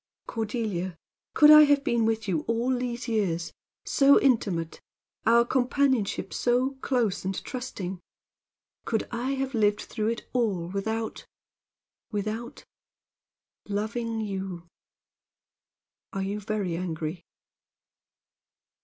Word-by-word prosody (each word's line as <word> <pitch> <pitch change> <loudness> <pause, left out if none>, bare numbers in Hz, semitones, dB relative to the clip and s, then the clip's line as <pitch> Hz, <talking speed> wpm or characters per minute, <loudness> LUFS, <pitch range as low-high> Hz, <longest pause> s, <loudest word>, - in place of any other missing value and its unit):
Cordelia, 210 -6 -3 0.4
could 300 0 +8
I 305 0 +11
have 285 -1 +3
been 235 -6 +1
with 225 -1 0
you 170 -5 0
all 235 +3 +1
these 245 0 -3
years 190 -7 -1 0.3
so 280 0 +5
intimate 195 -11 +1 0.5
our 235 +1 +6
companionship 260 -3 +1
so 250 +2 +1
close 235 -7 0
and 190 +1 -2
trusting 200 -8 -5 0.8
could 225 -2 -1
I 245 +3 -1
have 270 0 -2
lived 210 -2 +2
through 215 0 -3
it 230 +1 -3
all 200 -9 0
without 220 +4 -3 0.8
without 215 +3 -4 1.0
loving 220 +2 -2
you? 190 -4 -4 1.5
Are 195 - -2
you 200 +2 -2
very 205 -4 -2
angry?" 165 -1 -4
220 Hz, 105 wpm, -27 LUFS, 195-245 Hz, 1.5 s, I